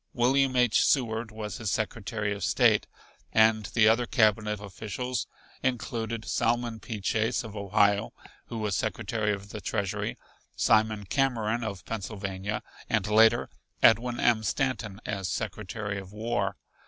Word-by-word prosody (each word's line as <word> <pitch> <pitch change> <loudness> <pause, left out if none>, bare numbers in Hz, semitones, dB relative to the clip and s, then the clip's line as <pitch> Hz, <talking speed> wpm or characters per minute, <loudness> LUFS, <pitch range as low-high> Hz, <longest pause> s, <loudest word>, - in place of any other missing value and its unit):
William 130 +2 +3
H. 125 -4 +4
Seward 115 -4 +1
was 105 -2 -5
his 110 - -3
Secretary 105 0 -2
of 100 -2 -6
State - - +3 0.4
and 110 -1 +4
the 110 -2 +4
other 115 +2 +3
cabinet 105 -1 +2
officials 110 +5 -4 0.3
included 115 -2 -2
Salmon 120 -1 0
P. 110 -2 -6
Chase 110 +6 0
of 110 -2 -9
Ohio, 100 0 +2 0.4
who 115 - -6
was 105 -3 -1
Secretary 105 +5 -1
of 100 0 -5
the 105 0 -7
Treasury, 100 -3 -2 0.4
Simon 110 -1 +2
Cameron 120 -1 0
of 100 -4 -5
Pennsylvania, 100 -1 -4 0.3
and 110 -4 +1
later 110 +2 +5 0.4
Edwin 120 +2 +4
M. 115 -2 +3
Stanton 110 -3 -2
as 95 -3 -3
Secretary 105 -1 -4
of 95 -1 -11
War. 115 +3 -2
110 Hz, 135 wpm, -28 LUFS, 105-115 Hz, 0.4 s, later